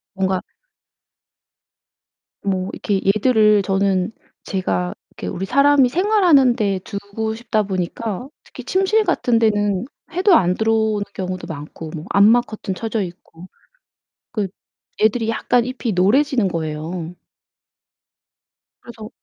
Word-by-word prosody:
뭔가 190 -1 0 2.0
뭐 190 -1 -1
이렇게 200 -2 -1
얘들을 215 0 +4
저는 195 0 +1 0.3
제가 95 - -2 0.2
이렇게 90 - -6
우리 185 - -3
사람이 280 +1 +4
생활하는데 275 - +3
두고 205 +2 -4
싶다 220 -2 -1
보니까 195 +5 -4 0.2
특히 - - -11
침실 390 +4 +2
같은 240 - +1
데는 205 -2 +1 0.3
해도 370 +2 +3
안 180 - +3
들어오는 220 -2 +1
경우도 185 -1 -5
많고 155 +1 -8
뭐 155 +3 -7
암막 225 +5 +5
커튼 210 -3 -5
쳐져 225 +2 -3
있고 175 0 -11 0.8
그 210 -4 -1 0.5
애들이 220 +1 +2
약간 235 +1 +1
잎이 250 -4 -3
노래지는 230 +4 +3
거예요. 165 +1 -4 1.7
그래서 225 -2 -10
210 Hz, 250 characters per minute, -20 LUFS, 185-240 Hz, 2.0 s, 암막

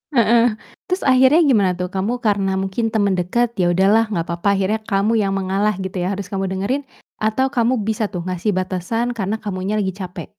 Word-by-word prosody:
Heeh. 235 0 +4 0.4
Terus 365 +1 -1
akhirnya 265 +5 +5
gimana 205 -9 +3
tuh? 180 0 -4
Kamu 220 +6 -2
karena 200 -3 +1
mungkin 205 +4 -2
temen 205 -3 +2
deket, 235 +7 0
ya 175 -1 +3
udahlah 205 +5 +4
gak 170 -5 -2
papa, 170 +4 +1
akhirnya 195 +3 0
kamu 210 +2 +1
yang 195 -1 0
mengalah 195 +2 0
gitu 190 0 -5
ya 185 +3 -1
harus 200 0 -5
kamu 195 0 -1
dengerin? 240 +10 -1 0.3
Atau 220 +5 0
kamu 240 -1 +1
bisa 220 +1 -1
tuh 180 -4 -4
ngasih 185 +3 -1
batasan 190 +6 -2
karena 215 0 -2
kamunya 195 0 -3
lagi 190 -2 0
capek? 180 -3 -7
200 Hz, 190 wpm, -20 LUFS, 190-230 Hz, 0.4 s, akhirnya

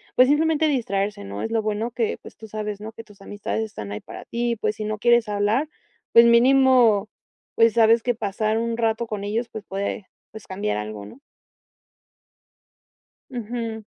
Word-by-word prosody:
pues 255 - +6
simplemente 315 +2 +2
distraerse, 205 - -1
¿no? 100 +1 -6
Es - - -3
lo 225 -1 0
bueno 215 +2 -2
que, 235 -2 -2
pues - - -13
tú 220 - -11
sabes, 210 -1 -5
¿no? 215 +1 -7
Que 225 0 -11
tus 210 -2 -19
amistades 205 +2 -4
están 105 - -7
ahí 105 - -4
para - - -11
ti, 235 0 -1
pues 215 0 -1
si 215 - -5
no 215 0 -3
quieres 235 0 +4
hablar, 210 +7 0 0.5
pues 230 0 +8
mínimo, 235 -3 +5 0.5
pues 230 -1 +4
sabes 230 0 +4
que 245 - +1
pasar 215 0 -1
un 230 0 -2
rato 225 0 0
con 210 -2 -5
ellos, 225 +3 -2
pues 220 - -8
puede, 195 +1 -4 0.2
pues, 220 -2 -11
cambiar 185 - -3
algo, 105 -1 -6
¿no? 255 - -14 2.1
Ujú. 230 -2 -5
220 Hz, 175 wpm, -23 LUFS, 205-235 Hz, 2.1 s, pues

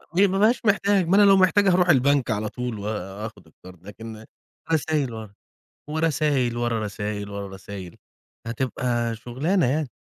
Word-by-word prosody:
ما 190 +5 +2
ما 195 +1 -1
بابقاش 230 +3 +3
محتاج، 200 -3 +3
ما 190 - +4
أنا 205 - +6
لو 200 -1 +7
محتاج 190 +1 +4
هاروح 180 -1 +3
البنك 140 -3 +3
على 110 -1 -1
طول 125 -2 -5
وآخد 105 0 -6
القَرْض، 90 -1 -16
لكن 110 +1 -9 0.5
رسايل 150 -5 0
ور 110 -2 -8 0.6
ورسايل، 150 -6 0
ورا 120 -2 0
راسايل، 105 0 -4
ورا 100 0 -5
راسايل، 95 -2 -9 0.5
هتبقى 120 -1 -2
شُغلانة 135 - 0
يعني. 140 0 -1
125 Hz, 150 wpm, -24 LUFS, 105-165 Hz, 0.6 s, لو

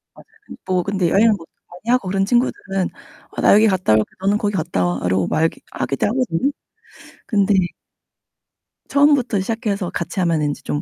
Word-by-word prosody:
맞아요. - - -16 0.2
근데 - - -12
뭐 185 -1 0
근데 190 -3 0
여행을 220 +6 +4
보통 165 - -13 0.2
많이 180 +7 -5
하고 250 -6 +1
그런 195 +1 0
친구들은 195 -5 0 0.4
'어 - - -5
나 - - +6
여기 215 +2 +6
갔다 185 - +2
올게, 110 0 +4 0.2
너는 200 +2 +2
거기 205 -1 -1
갔다 155 - -1
와.' 90 0 -1
라고 95 0 +1
말기 160 +1 0
하기도 135 - -1
하거든요. 255 - 0 0.8
근데 205 -2 +2 1.4
처음부터 280 -6 +3
시작해서 205 -2 -2
같이 170 +2 -4
하면은 165 -4 +1
인제 145 - -4
좀 145 - -2
195 Hz, 370 characters per minute, -20 LUFS, 165-220 Hz, 1.4 s, 나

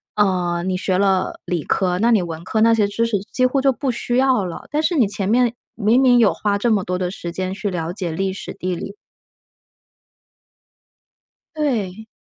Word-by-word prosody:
呃， 180 -4 +1
你 185 0 -1
学 185 0 0
了 190 -2 +1
理 175 -4 -2
科， 180 -2 0
那 235 +2 +3
你 215 -5 +4
文 165 -1 -6
科 220 +2 0
那 230 0 +5
些 210 -2 +2
知 225 +3 0
识 215 -3 0
几 255 - 0
乎 270 +2 +1
就 270 -1 +3
不 270 +2 -3
需 240 +1 -1
要 260 -7 +3
了， 170 - -7
但 300 +1 +1
是 345 - +1
你 240 -8 +4
前 200 -1 -2
面 240 0 +3 0.2
明 225 +3 +3
明 245 -2 +5
有 220 - +5
花 205 -1 -1
这 235 +1 +1
么 200 -3 +2
多 180 0 -2
的 180 -1 -2
时 170 -3 -6
间 185 +1 -3
去 205 +1 -3
了 170 -1 -3
解 180 -4 -3
历 190 +3 -1
史、 - - -6
地 185 0 -3
理。 200 +4 -7 2.6
对。 220 -8 -2
200 Hz, 215 characters per minute, -20 LUFS, 185-235 Hz, 2.6 s, 那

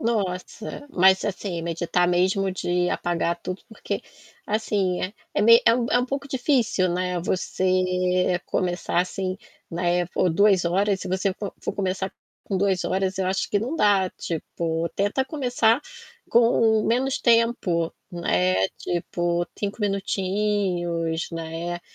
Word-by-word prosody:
Nossa, 215 +3 -3
mas, 190 -1 +4
assim, 190 -3 -3
meditar 170 +1 0
mesmo 185 +2 +2
de 180 -1 0
apagar 170 -1 0
tudo, 185 +1 -5
porque 220 - -4 0.5
assim, 205 -4 0 0.3
é - - +2
me 230 +2 +8
é 230 - +7
um 240 -1 0
é - - +4
um 250 - 0
pouco 275 +1 -4
difícil, 245 -8 +1
né, 180 0 -1
você 185 0 +1
começar 175 -1 0
assim, 185 +1 -3 0.3
né, 175 0 0
por 180 +1 +1
2 195 +1 +4
horas. 195 +3 +1
Se - - -5
você 190 +1 0
fo 200 -1 -6
for - - -3
começar 190 -1 -2 0.3
com 195 - -2
2 190 -1 +1
horas, 190 0 -1
eu 190 - 0
acho 190 +1 -1
que 205 - +2
não 240 +9 -3
dá, 200 - +3
tipo, 165 0 -3
tenta 205 +7 0
começar 245 -4 +1 0.5
com 230 -2 +4
menos 260 +4 +1
tempo, 230 -8 +2 0.2
né. 95 - +1
Tipo 175 0 -1
5 205 +2 -3
minutinhos, 190 -4 -1
né? 165 +1 -4
185 Hz, 135 wpm, -24 LUFS, 175-210 Hz, 0.5 s, me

